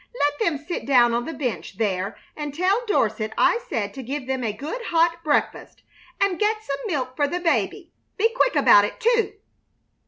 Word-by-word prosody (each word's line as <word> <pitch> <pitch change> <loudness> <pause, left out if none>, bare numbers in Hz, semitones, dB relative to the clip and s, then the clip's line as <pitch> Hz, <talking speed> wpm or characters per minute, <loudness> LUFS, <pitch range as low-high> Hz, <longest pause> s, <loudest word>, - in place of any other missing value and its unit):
Let 290 0 +1
them 325 -4 +1
sit 315 +2 -6
down 240 -3 +5
on 240 +1 -1
the 325 - -5
bench 240 -9 -4
there 195 -3 -1 0.2
and 295 -2 -5
tell 380 +8 +1
Dorset 220 - 0
I 475 - +4
said 205 -2 -2
to 270 - -7
give 265 +2 -5
them 260 -1 -2
a 220 - 0
good 295 - -6
hot 335 0 +1
breakfast, 295 -2 -1 0.4
and 395 -3 +1
get 430 +1 +1
some 275 -7 -4
milk 260 -8 -2
for 290 +1 +1
the 355 +5 -2
baby. 330 - -1 0.3
Be 455 +2 +2
quick - - +2
about 205 - +6
it, 205 - -4
too!" 470 -1 +2
290 Hz, 190 wpm, -23 LUFS, 240-365 Hz, 0.4 s, about